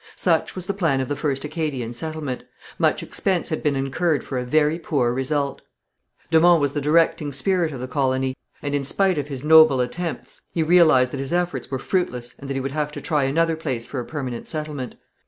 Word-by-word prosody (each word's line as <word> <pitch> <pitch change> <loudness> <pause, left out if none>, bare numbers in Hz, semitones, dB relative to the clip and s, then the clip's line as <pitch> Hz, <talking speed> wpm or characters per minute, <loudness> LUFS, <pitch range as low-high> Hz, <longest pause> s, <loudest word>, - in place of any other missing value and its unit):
Such 165 -3 +1
was 185 -2 -4
the 200 - -2
plan 165 -9 +1
of 130 - -2
the 145 - -1
first 140 -2 -2
Acadian 150 -6 -3
settlement. 150 -1 -4 0.4
Much - - +2
expense 185 -3 -1
had 155 - -2
been 145 -2 +1
incurred 140 +4 0
for 130 - -3
a - - -2
very 155 +5 +2
poor 135 -7 0
result. 140 +2 -1 0.7
De 160 - +6
Monts 175 0 +6
was 145 -1 0
the 145 - -1
directing 150 0 +2
spirit 165 +4 +1
of 135 - -7
the 130 - -5
colony, 130 0 0 0.3
and 145 -1 -2
in 145 -1 0
spite 185 +4 +2
of 145 - -4
his 135 -2 -6
noble 155 -3 +7
attempts, 165 +7 -4
he 165 - 0
realized 155 -7 +5
that 140 - -3
his 135 0 -3
efforts 175 -7 -1
were 135 - -2
fruitless 125 -6 -2
and 140 - -9
that 135 - -2
he - - 0
would 135 +1 -3
have 150 0 -2
to - - -5
try 150 -3 0
another 165 +4 +1
place 130 -7 -3
for 135 - -5
a 120 - -4
permanent 130 -5 -5
settlement. 150 -5 -4
145 Hz, 215 wpm, -23 LUFS, 130-160 Hz, 0.7 s, noble